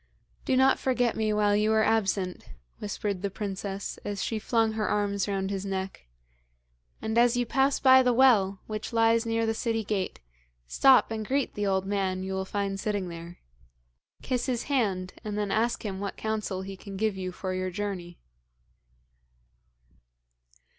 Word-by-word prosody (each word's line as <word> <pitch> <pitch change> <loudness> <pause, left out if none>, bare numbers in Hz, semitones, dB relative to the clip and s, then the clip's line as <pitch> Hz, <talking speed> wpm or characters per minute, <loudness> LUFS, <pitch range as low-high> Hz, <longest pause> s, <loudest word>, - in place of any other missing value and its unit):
'Do 260 - +2
not 265 0 +4
forget 245 -3 +1
me 220 -1 0
while 210 -1 +3
you 210 +1 +2
are 220 0 +4
absent,' 195 -5 0 0.3
whispered 205 -2 -3
the 200 - -1
princess 195 0 -5
as 200 -2 -3
she 220 +1 -2
flung 225 0 +1
her 220 -1 -1
arms 200 -2 0
round 195 -1 -1
his 195 -1 -3
neck; 190 - -4 1.0
'and 220 +1 +1
as 240 0 +4
you 245 - +1
pass 270 +3 +2
by 260 -1 +7
the 250 -1 +3
well 225 -7 +4
which 215 -1 -5
lies 230 0 +3
near 225 0 +1
the 225 - +1
city 225 0 -1
gate, 200 -3 -2 0.5
stop 260 - +5
and 220 -1 -3
greet 275 +1 0
the 205 -1 -2
old 190 -1 +1
man 190 -2 -1
you 190 0 -4
will 190 0 -2
find 195 0 -2
sitting 200 -3 -2
there. 170 +1 -9 0.9
Kiss 250 -1 -1
his 245 -3 -1
hand, 200 -10 -1
and 210 -1 -4
then 205 -2 -1
ask 230 +2 0
him 190 -2 -3
what 200 0 -4
counsel 215 -4 -2
he 195 0 -7
can 195 0 -9
give 215 0 0
you 185 -1 -4
for 185 +1 -4
your 185 0 -2
journey.' 180 -3 -5
205 Hz, 170 wpm, -28 LUFS, 190-225 Hz, 1.0 s, by